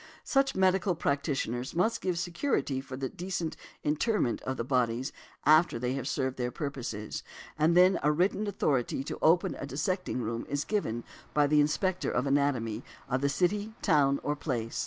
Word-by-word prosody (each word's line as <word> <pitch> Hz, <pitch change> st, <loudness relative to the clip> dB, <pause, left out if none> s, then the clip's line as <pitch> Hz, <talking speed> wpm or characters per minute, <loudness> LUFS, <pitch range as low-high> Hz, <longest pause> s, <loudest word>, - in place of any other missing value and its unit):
Such 275 Hz, 0 st, +2 dB
medical 190 Hz, -1 st, +3 dB
practitioners 140 Hz, -5 st, -1 dB
must 220 Hz, +7 st, +1 dB
give 180 Hz, -2 st, -1 dB
security 170 Hz, -, -1 dB
for 130 Hz, -1 st, -8 dB
the 135 Hz, 0 st, -2 dB
decent 175 Hz, 0 st, -4 dB, 0.3 s
interment 150 Hz, -, +1 dB
of 130 Hz, 0 st, -3 dB
the -, -, -1 dB
bodies 125 Hz, 0 st, 0 dB, 0.3 s
after 155 Hz, -2 st, +5 dB
they 125 Hz, +2 st, -1 dB
have 135 Hz, -1 st, -3 dB
served 130 Hz, -3 st, -1 dB
their 125 Hz, -1 st, -1 dB
purposes; 125 Hz, -7 st, -4 dB, 0.3 s
and 160 Hz, +3 st, +3 dB
then 185 Hz, +1 st, +6 dB
a 150 Hz, -, +3 dB
written 190 Hz, +6 st, +1 dB
authority 135 Hz, -9 st, 0 dB
to -, -, -6 dB
open 170 Hz, +3 st, +4 dB
a 140 Hz, -, -4 dB
dissecting 180 Hz, +1 st, -2 dB
room 115 Hz, +1 st, -3 dB
is 145 Hz, 0 st, -1 dB
given 120 Hz, -, -1 dB, 0.3 s
by 150 Hz, -1 st, +5 dB
the 150 Hz, +1 st, +4 dB
Inspector 185 Hz, +5 st, 0 dB
of 120 Hz, -, 0 dB
Anatomy 135 Hz, -6 st, +1 dB, 0.3 s
of 130 Hz, 0 st, 0 dB
the 140 Hz, -, +2 dB
city, 205 Hz, +8 st, 0 dB
town, 140 Hz, -3 st, +3 dB
or 150 Hz, -, 0 dB
place. 120 Hz, -6 st, -3 dB
145 Hz, 170 wpm, -30 LUFS, 130-180 Hz, 0.3 s, then